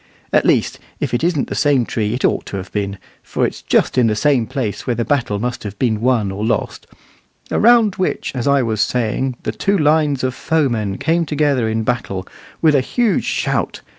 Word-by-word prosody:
At -, -, +3 dB
least, -, -, +1 dB, 0.2 s
if -, -, -3 dB
it 120 Hz, -, 0 dB
isn't 170 Hz, -5 st, +1 dB
the -, -, -4 dB
same 140 Hz, -5 st, +2 dB
tree 110 Hz, 0 st, -1 dB
it 130 Hz, -, -1 dB
ought -, -, 0 dB
to 100 Hz, -, -4 dB
have 95 Hz, 0 st, -7 dB
been, 100 Hz, -1 st, -3 dB, 0.2 s
for -, -, -1 dB
it's -, -, -4 dB
just -, -, +2 dB
in 120 Hz, -, +4 dB
the 115 Hz, +2 st, +2 dB
place 120 Hz, -7 st, -3 dB
where 120 Hz, -, +1 dB
the 115 Hz, 0 st, -1 dB
battle 120 Hz, -8 st, 0 dB
must 120 Hz, +3 st, -3 dB
have 100 Hz, -1 st, -7 dB
been 110 Hz, -3 st, 0 dB
won 115 Hz, -5 st, +1 dB
or 100 Hz, +2 st, -4 dB
lost 115 Hz, 0 st, -2 dB, 0.6 s
"around 230 Hz, -3 st, +4 dB
which, 185 Hz, -, -1 dB
as 125 Hz, -1 st, -3 dB
I 140 Hz, -2 st, +3 dB
was 110 Hz, -2 st, -1 dB
saying, 125 Hz, +3 st, 0 dB
the -, -, -1 dB
two 200 Hz, 0 st, 0 dB
lines 150 Hz, -4 st, +2 dB
of 130 Hz, -1 st, 0 dB
foemen 120 Hz, -12 st, 0 dB
came 165 Hz, +2 st, +1 dB
together 145 Hz, -6 st, +1 dB
in 110 Hz, 0 st, -1 dB
battle 100 Hz, -5 st, -2 dB, 0.4 s
with 155 Hz, -2 st, +5 dB
a 140 Hz, -, +4 dB
huge 230 Hz, -, 0 dB
shout. -, -, -1 dB
125 Hz, 200 wpm, -18 LUFS, 110-145 Hz, 0.6 s, with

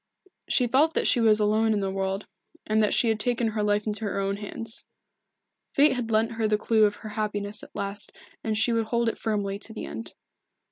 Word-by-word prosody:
She 250 Hz, -, +3 dB
felt 280 Hz, +7 st, +3 dB
that -, -, +2 dB
she -, -, +4 dB
was 220 Hz, -1 st, +5 dB
alone 215 Hz, +1 st, +2 dB
in 210 Hz, -, 0 dB
the 195 Hz, -1 st, -1 dB
world, 195 Hz, +1 st, -2 dB, 0.4 s
and 215 Hz, 0 st, +2 dB
that 210 Hz, -, +2 dB
she 235 Hz, -, +3 dB
had 220 Hz, -1 st, 0 dB
taken 235 Hz, 0 st, +1 dB
her 215 Hz, -1 st, -2 dB
life 210 Hz, 0 st, +1 dB
into 215 Hz, 0 st, -2 dB
her 200 Hz, -, -2 dB
own 195 Hz, 0 st, -1 dB
hands. 220 Hz, +2 st, -6 dB, 0.9 s
Fate 290 Hz, +1 st, +6 dB
had 245 Hz, -3 st, -3 dB
lent 225 Hz, +1 st, +2 dB
her 225 Hz, -1 st, 0 dB
the 210 Hz, 0 st, +2 dB
clue 220 Hz, 0 st, +3 dB
of 205 Hz, -, 0 dB
her -, -, -4 dB
happiness 210 Hz, -1 st, -2 dB
at -, -, -14 dB
last 200 Hz, +1 st, -2 dB, 0.3 s
and 215 Hz, -1 st, -1 dB
she 235 Hz, +2 st, +3 dB
would 225 Hz, -1 st, +1 dB
hold 235 Hz, +1 st, +1 dB
it -, -, -6 dB
firmly 200 Hz, -3 st, -2 dB
to 220 Hz, -, -3 dB
the -, -, -6 dB
end. 115 Hz, +1 st, -7 dB
215 Hz, 225 wpm, -26 LUFS, 205-225 Hz, 0.9 s, Fate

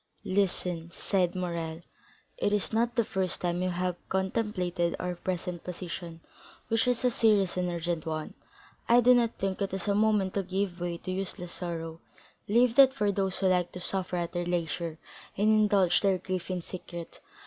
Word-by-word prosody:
"Listen," 180 Hz, -3 st, 0 dB
said 180 Hz, -1 st, 0 dB
Morrel; 170 Hz, -2 st, -3 dB, 0.6 s
"it 205 Hz, -, +1 dB
is 210 Hz, +1 st, 0 dB
not 235 Hz, +2 st, +1 dB
the 235 Hz, -3 st, +2 dB
first 190 Hz, -2 st, -1 dB
time 175 Hz, 0 st, 0 dB
you 185 Hz, -, +1 dB
have 180 Hz, 0 st, -1 dB
contemplated 190 Hz, -3 st, 0 dB
our 180 Hz, 0 st, -2 dB
present 180 Hz, -1 st, -4 dB
position, 175 Hz, -2 st, -6 dB, 0.5 s
which 225 Hz, +2 st, +2 dB
is 250 Hz, 0 st, +1 dB
a 250 Hz, -, +4 dB
serious 210 Hz, -6 st, +3 dB
and 180 Hz, -1 st, 0 dB
urgent 170 Hz, -1 st, -2 dB
one; 155 Hz, -1 st, -3 dB, 0.6 s
I 240 Hz, +1 st, +7 dB
do 250 Hz, +1 st, +7 dB
not 235 Hz, -2 st, +2 dB
think 195 Hz, 0 st, -2 dB
it 195 Hz, -1 st, -1 dB
is 190 Hz, 0 st, -5 dB
a 200 Hz, -, +3 dB
moment 210 Hz, -2 st, +2 dB
to 200 Hz, -, +1 dB
give 190 Hz, -1 st, -2 dB
way 175 Hz, -1 st, -2 dB
to 185 Hz, -, -6 dB
useless 185 Hz, -2 st, -4 dB
sorrow; 165 Hz, -2 st, -5 dB, 0.5 s
leave 235 Hz, +2 st, +4 dB
that 270 Hz, -1 st, +8 dB
for 210 Hz, -4 st, +2 dB
those 195 Hz, -1 st, -1 dB
who 195 Hz, -, -1 dB
like 180 Hz, -2 st, +2 dB
to 180 Hz, -, -6 dB
suffer 185 Hz, 0 st, -2 dB
at 170 Hz, -1 st, -2 dB
their 175 Hz, -1 st, -2 dB
leisure 170 Hz, -1 st, -2 dB, 0.4 s
and 210 Hz, +2 st, +3 dB
indulge 205 Hz, -5 st, +4 dB
their 195 Hz, -2 st, +3 dB
grief 185 Hz, -1 st, -4 dB
in 180 Hz, -2 st, -2 dB
secret. 175 Hz, -2 st, -8 dB
185 Hz, 180 wpm, -29 LUFS, 175-205 Hz, 0.6 s, that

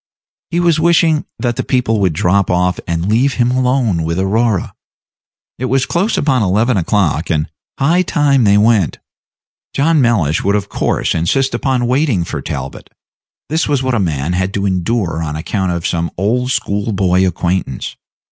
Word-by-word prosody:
He 175 Hz, -, -1 dB
was 170 Hz, -2 st, +2 dB
wishing 165 Hz, -2 st, +3 dB
that 120 Hz, -2 st, -2 dB
the -, -, -1 dB
people 120 Hz, -4 st, 0 dB
would 95 Hz, -4 st, +1 dB
drop 90 Hz, +5 st, +1 dB
off 90 Hz, -1 st, +1 dB
and 85 Hz, +1 st, -2 dB
leave 125 Hz, +6 st, +2 dB
him 120 Hz, 0 st, +1 dB
alone 125 Hz, -7 st, +1 dB
with 80 Hz, +1 st, -2 dB
Aurora. 105 Hz, +1 st, 0 dB, 0.9 s
It 130 Hz, -, -2 dB
was 135 Hz, +1 st, +1 dB
close 195 Hz, +6 st, 0 dB
upon 135 Hz, -4 st, +1 dB
eleven 110 Hz, +5 st, +2 dB
o'clock, 85 Hz, -4 st, 0 dB
and 75 Hz, -2 st, 0 dB, 0.3 s
high 165 Hz, +6 st, +2 dB
time 145 Hz, -6 st, +2 dB
they 100 Hz, -1 st, +4 dB
went. 105 Hz, -, +2 dB, 0.8 s
John 155 Hz, +2 st, +3 dB
Mellish 95 Hz, -, +1 dB
would 100 Hz, +1 st, +1 dB
of 100 Hz, -1 st, -2 dB
course -, -, -1 dB
insist 130 Hz, +11 st, 0 dB
upon 125 Hz, 0 st, 0 dB
waiting 125 Hz, -, +1 dB
for -, -, -5 dB
Talbot; 65 Hz, 0 st, -6 dB, 0.6 s
this 160 Hz, +2 st, 0 dB
was 140 Hz, -3 st, 0 dB
what 130 Hz, -1 st, 0 dB
a 120 Hz, -, +1 dB
man 80 Hz, -3 st, -1 dB
had 95 Hz, +2 st, -1 dB
to 100 Hz, 0 st, -1 dB
endure 90 Hz, -2 st, -1 dB
on 75 Hz, -2 st, -3 dB
account 95 Hz, +4 st, -2 dB
of 85 Hz, -1 st, -3 dB
some 85 Hz, -1 st, -1 dB
old 120 Hz, +7 st, 0 dB
school 105 Hz, -3 st, -1 dB
boy 95 Hz, -1 st, +2 dB
acquaintance. 90 Hz, -5 st, -2 dB
105 Hz, 170 wpm, -16 LUFS, 90-130 Hz, 0.9 s, they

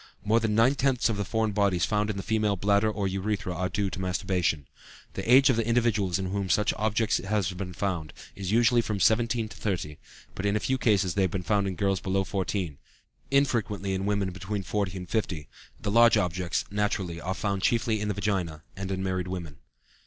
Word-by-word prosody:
More 110 Hz, +3 st, +4 dB
than 110 Hz, -2 st, 0 dB
nine 115 Hz, +5 st, +5 dB
tenths 130 Hz, -3 st, +1 dB
of 110 Hz, -, -1 dB
the 100 Hz, -, -1 dB
foreign 110 Hz, +1 st, 0 dB
bodies 100 Hz, -3 st, +2 dB
found 105 Hz, 0 st, 0 dB
in 105 Hz, -, -2 dB
the 95 Hz, -, -4 dB
female 105 Hz, -2 st, +1 dB
bladder 100 Hz, +3 st, +2 dB
or 105 Hz, -2 st, -1 dB
urethra 95 Hz, 0 st, -2 dB
are 90 Hz, +1 st, -2 dB
due 100 Hz, +1 st, -1 dB
to 95 Hz, -, -5 dB
masturbation. 90 Hz, -5 st, -1 dB, 0.5 s
The 95 Hz, +5 st, -2 dB
age 135 Hz, +1 st, +7 dB
of 120 Hz, -, 0 dB
the 115 Hz, -1 st, 0 dB
individuals 115 Hz, -6 st, +2 dB
in 95 Hz, -1 st, -3 dB
whom 100 Hz, -1 st, -2 dB
such 105 Hz, +2 st, +2 dB
objects 110 Hz, 0 st, +1 dB
have 100 Hz, -1 st, -1 dB
been 90 Hz, -1 st, -5 dB
found 90 Hz, -6 st, -2 dB, 0.2 s
is 95 Hz, -1 st, -4 dB
usually 120 Hz, +1 st, +4 dB
from 105 Hz, -3 st, -3 dB
17 115 Hz, +1 st, +2 dB
to 105 Hz, -, -11 dB
30, 90 Hz, -8 st, -3 dB, 0.3 s
but -, -, -6 dB
in 100 Hz, -, +1 dB
a -, -, +2 dB
few 130 Hz, +4 st, -1 dB
cases 100 Hz, -7 st, +2 dB
they 100 Hz, -, +1 dB
have 95 Hz, -, +2 dB
been 90 Hz, +1 st, -3 dB
found 100 Hz, 0 st, +1 dB
in 95 Hz, -, -3 dB
girls 100 Hz, 0 st, +1 dB
below 95 Hz, +1 st, 0 dB
14, 90 Hz, -4 st, -3 dB, 0.5 s
infrequently 115 Hz, -8 st, +1 dB
in 95 Hz, +1 st, -2 dB
women 100 Hz, -2 st, 0 dB
between 95 Hz, +3 st, -4 dB
40 95 Hz, -1 st, -2 dB
and 90 Hz, -1 st, -7 dB
50; 85 Hz, -9 st, -2 dB, 0.3 s
the 105 Hz, -, -2 dB
large 115 Hz, +1 st, +6 dB
objects, 90 Hz, -2 st, -1 dB
naturally, 100 Hz, -5 st, -1 dB
are 95 Hz, +3 st, -3 dB
found 100 Hz, -2 st, -2 dB
chiefly 110 Hz, +1 st, +1 dB
in 105 Hz, -, -1 dB
the 105 Hz, -, -1 dB
vagina, 95 Hz, -7 st, -2 dB
and 95 Hz, 0 st, -5 dB
in 95 Hz, 0 st, -2 dB
married 95 Hz, -1 st, -1 dB
women. 85 Hz, -5 st, -6 dB
100 Hz, 210 wpm, -27 LUFS, 95-110 Hz, 0.5 s, age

